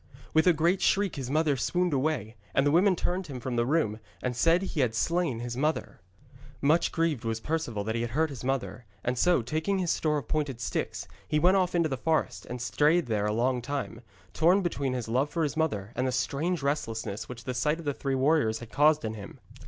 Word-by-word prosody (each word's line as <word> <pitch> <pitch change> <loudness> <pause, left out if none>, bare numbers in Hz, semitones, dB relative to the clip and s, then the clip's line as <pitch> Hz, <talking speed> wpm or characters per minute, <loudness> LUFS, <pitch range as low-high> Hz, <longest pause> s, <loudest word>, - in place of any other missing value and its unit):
With 160 +2 +4
a - - +8
great 170 +3 +1
shriek 200 -1 +2
his 135 -4 -5
mother 155 0 +2
swooned 175 +6 0
away, 130 -6 -1 0.2
and 135 - +3
the 145 - +3
women 185 +4 +4
turned 180 +2 -2
him 135 -4 -6
from 125 0 -4
the 120 0 +1
room 135 -8 +1 0.2
and 125 -1 -1
said 165 +8 +3
he 185 -4 -4
had 120 -5 +1
slain 165 -4 0
his 120 0 -4
mother. 150 - -2 0.6
Much 155 +4 +3
grieved 165 -7 0
was 115 -1 -2
Perceval 150 -7 -2
that 110 +2 -2
he 115 - -1
had 120 - -2
hurt 155 +5 0
his 125 -3 -8
mother, 125 -2 -2 0.2
and 120 - 0
so, 175 0 +3
taking 160 - -1
his 180 -3 0
store 150 -1 +1
of 135 -6 -5
pointed 145 -6 -1
sticks, - - -3 0.2
he 150 - +1
went 180 +5 +4
off 180 -1 +1
into 170 -2 +3
the 135 -3 -3
forest, 160 +4 -1
and 125 - -5
strayed 155 +7 +3
there 105 -3 0
a - - 0
long 125 +3 +1
time, 135 -3 -4 0.3
torn 180 +5 +4
between 140 -6 -1
his 125 -3 -3
love 130 +6 +1
for 165 +1 -1
his 145 -1 -1
mother, 115 -11 -1
and 130 +2 0
the - - 0
strange 145 +6 -1
restlessness 115 -7 -2
which 120 -2 -8
the 130 - -3
sight 150 +5 +1
of 170 - -10
the 145 - 0
three 135 0 -2
warriors 135 -5 +2
had 115 0 -10
caused 150 -1 +4
in 110 - -2
him. 100 -2 -10
140 Hz, 230 wpm, -28 LUFS, 120-160 Hz, 0.6 s, a